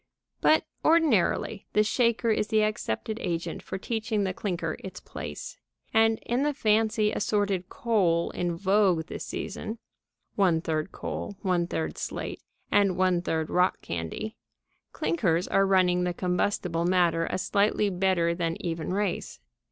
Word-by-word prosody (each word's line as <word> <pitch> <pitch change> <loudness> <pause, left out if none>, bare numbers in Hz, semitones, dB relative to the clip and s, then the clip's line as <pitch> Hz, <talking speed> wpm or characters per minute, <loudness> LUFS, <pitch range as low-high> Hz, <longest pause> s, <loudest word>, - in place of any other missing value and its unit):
But, 315 0 +4 0.2
ordinarily, 265 - +2
the 210 - +5
shaker 230 +1 +2
is 210 - +1
the 215 0 +3
accepted 215 - -2
agent 170 -3 -3
for - - -5
teaching 220 0 -1
the 190 -1 -1
clinker 170 -5 -3
its 185 -1 -7
place. 75 -1 -7 0.4
And, 225 0 +4
in 240 +2 0
the 295 0 +1
fancy 215 -2 +2
assorted 200 -3 0
coal 185 -8 +1
in 175 -1 -2
vogue 190 -3 +3
this - - -6
season 220 +2 -5 0.6
(one 180 -5 +3
third 160 +2 -2
coal, 200 - -5
one 180 -3 +1
third 80 - -3
slate, - - -4 0.3
and 195 -3 +3
one 185 -2 +2
third 160 -2 -2
rock 180 +1 +2
candy) 85 - -4 0.6
clinkers 180 - 0
are 195 0 +3
running 180 -2 +3
the 180 -1 -1
combustible 180 -2 0
matter 170 -2 +2
a - - -2
slightly 205 +1 +1
better 180 -2 +2
than 170 -1 -2
even 165 -1 -3
race. 200 -3 -2
185 Hz, 145 wpm, -27 LUFS, 170-215 Hz, 0.6 s, the